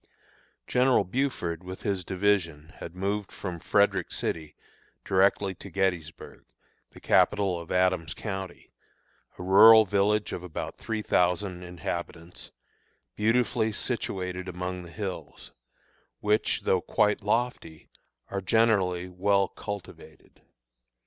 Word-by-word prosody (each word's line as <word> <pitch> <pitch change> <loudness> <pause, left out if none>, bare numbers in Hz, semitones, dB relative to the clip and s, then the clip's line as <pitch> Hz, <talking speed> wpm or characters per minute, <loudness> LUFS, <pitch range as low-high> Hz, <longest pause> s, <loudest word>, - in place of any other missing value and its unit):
General 125 -3 +3
Buford, 95 - -2
with 95 +1 -8
his 100 -3 -1
division, 90 -6 -1
had 85 - -9
moved 100 +2 -2
from 90 -4 -6
Frederick - - +1
City 80 -2 -4 0.5
directly 95 0 +2
to 100 - -11
Gettysburg, 90 -4 -3 0.5
the - - -15
capital 100 -4 +2
of 85 - -10
Adams 90 -3 +1
County, 95 -4 -6 0.7
a - - -7
rural 110 +4 +8
village 105 +2 +1
of - - -4
about 90 -3 -6
three 110 -1 -3
thousand 90 0 +1
inhabitants, 85 -1 -6 0.7
beautifully 110 0 +1
situated 95 -5 -3
among 90 0 -4
the 85 - -11
hills, 100 -1 -7 0.7
which, 105 +1 +1
though - - +1
quite 105 +1 +1
lofty, 105 -7 -2 0.4
are 100 0 -3
generally 95 -4 +2
well 100 +2 +1
cultivated. 100 -3 -10
95 Hz, 110 wpm, -27 LUFS, 90-105 Hz, 0.7 s, rural